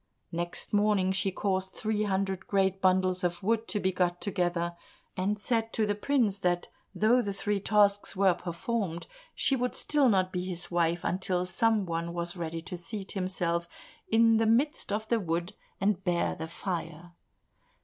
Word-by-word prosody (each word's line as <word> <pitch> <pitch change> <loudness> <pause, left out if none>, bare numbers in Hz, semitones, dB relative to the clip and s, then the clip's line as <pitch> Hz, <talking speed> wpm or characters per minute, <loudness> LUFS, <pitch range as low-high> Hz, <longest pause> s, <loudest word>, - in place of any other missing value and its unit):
Next 175 +4 -3
morning 205 -2 +3
she 195 +1 0
caused 190 0 -1
three 215 -1 -1
hundred 195 -1 -1
great 195 -1 +1
bundles 185 -1 +2
of 175 0 -1
wood 225 +2 +1
to 210 - -1
be 190 -1 +1
got 175 -1 0
together, 175 -3 -1 0.4
and 200 +3 0
said 225 +1 0
to 220 - +2
the 205 - +1
prince 210 -2 +1
that 175 -2 0 0.3
though 235 +4 +4
the 200 -3 -3
three 205 0 -1
tasks 205 0 +3
were 195 -1 +4
performed, 175 +1 -3 0.3
she 270 - +3
would 250 -1 -1
still 290 -4 +3
not 185 -3 +2
be 180 -1 -1
his 175 -1 -3
wife 170 0 +1
until 180 -1 0
some 210 +3 +2
one 170 0 -3
was 170 +1 -3
ready 165 -1 -4
to 180 +1 -6
seat 195 +3 -6
himself 175 -3 -1 0.4
in 225 0 +5
the 225 0 +2
midst 265 +4 +2
of 215 +2 -2
the 235 0 +2
wood, 170 +1 -2 0.3
and 200 -1 +1
bear 175 -2 +1
the 160 - -6
fire. 170 -1 -5
190 Hz, 170 wpm, -29 LUFS, 175-210 Hz, 0.4 s, in